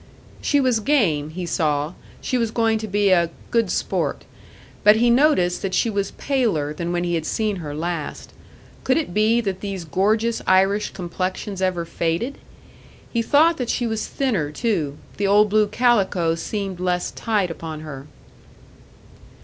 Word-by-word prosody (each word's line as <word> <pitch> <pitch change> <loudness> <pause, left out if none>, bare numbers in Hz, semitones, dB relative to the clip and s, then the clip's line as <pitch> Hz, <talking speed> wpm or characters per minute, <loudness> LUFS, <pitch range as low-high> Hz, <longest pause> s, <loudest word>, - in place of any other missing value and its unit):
She 290 - +2
was 255 -4 +2
game, 200 - +1
he 175 +3 -5
saw; 155 -1 0 0.3
she 255 - -2
was 230 -2 +1
going 225 -1 +1
to 220 - -5
be 205 -1 +2
a 170 -2 +4 0.2
"good 230 -4 +2
sport." - - -1 0.6
But 210 0 +7
he 235 +2 +3
noticed 240 - +3
that 190 -1 -2
she 230 - +2
was 200 -1 -1
paler 215 - 0
than 170 +2 -4
when 175 0 0
he 175 -1 -1
had 165 -2 -1
seen 215 -3 -1
her 150 -4 -6
last. 165 -1 -4 0.5
Could 260 - +2
it 305 - -2
be 220 +3 +3
that 195 -4 -3
these 195 -4 -5
gorgeous 215 +8 +1
Irish 195 +3 +3
complexions 185 +2 -4
ever 180 -2 0
faded? 170 +12 -2 0.7
He 235 - +2
thought 310 +8 +4
that 250 -3 -3
she 245 - 0
was 220 -2 -2
thinner 210 - -1
too; 155 - -1 0.2
the 200 - 0
old 205 +1 +5
blue 215 0 +4
calico 200 -8 +2
seemed 190 +2 -4
less 180 -1 -1
tight 205 -6 -1
upon 160 -2 -7
her. 140 -3 -8
195 Hz, 165 wpm, -22 LUFS, 170-225 Hz, 0.7 s, But